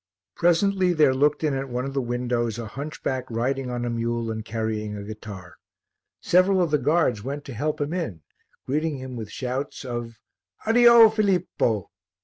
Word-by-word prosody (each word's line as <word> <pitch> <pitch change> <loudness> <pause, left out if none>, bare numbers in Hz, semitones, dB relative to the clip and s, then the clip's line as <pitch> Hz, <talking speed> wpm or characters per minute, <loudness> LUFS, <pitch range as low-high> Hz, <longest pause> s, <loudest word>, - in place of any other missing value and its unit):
Presently 180 +2 +3
there 150 -5 +4
looked 145 +3 +2
in 150 -2 +1
at 135 0 -3
one 125 +1 -2
of 135 - -5
the 135 - 0
windows 120 -2 -1
a 115 - -5
hunchback 135 +1 -4
riding 125 +3 -1
on 120 -1 -3
a - - -1
mule 115 0 -2
and 110 0 -4
carrying 110 -1 -3
a 100 - -6
guitar. 105 -3 -9 0.6
Several 185 +2 +3
of 175 -4 +1
the 150 - +3
guards 140 -6 +1
went 140 +3 -5
to 135 - -7
help 150 +7 -2
him 145 +2 -2
in, 110 - -4 0.4
greeting 150 +2 -1
him 130 -1 -7
with 110 -3 -6
shouts 130 +2 -4
of 120 -2 -5 0.5
"Addio, 235 0 +8
Filippo!" 180 - 0
130 Hz, 170 wpm, -24 LUFS, 115-155 Hz, 0.6 s, Addio